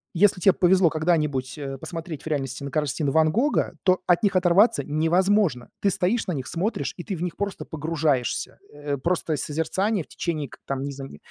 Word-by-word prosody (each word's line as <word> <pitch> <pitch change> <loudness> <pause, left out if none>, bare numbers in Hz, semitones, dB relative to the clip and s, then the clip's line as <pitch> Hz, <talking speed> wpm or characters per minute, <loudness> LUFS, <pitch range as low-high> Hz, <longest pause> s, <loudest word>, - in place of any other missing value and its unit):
если 190 +1 +4
те 195 - +6
повезло 185 -2 +4
когда-нибудь, 150 -4 0
э, 135 -2 -5
посмотреть 165 -1 -7
в - - -8
реальности 135 -2 -3
на 140 - -5
картины 150 -1 0
Ван 155 0 +4
Гога, 275 - +1
то 185 -1 +3
от 175 +3 +3
них 200 -2 +2
оторваться 180 - +4
невозможно. 165 - +2
Ты 200 - +3
стоишь 205 +6 0
на 180 - -1
них, 130 -2 -5
смотришь, 190 +7 -2
и - - -4
ты 195 - -4
в - - -8
них 175 -3 -3
просто 200 -1 -3
погружаешься. 150 -5 -1 0.2
Э, 145 -1 -3
просто 165 0 -1
созерцание 180 - -1
в - - -40
течение 155 -5 -3
к - - -14
там, 135 0 -2
не 140 - -3
знаю, 135 0 -8
н - - -11
160 Hz, 200 wpm, -24 LUFS, 145-185 Hz, 0.2 s, те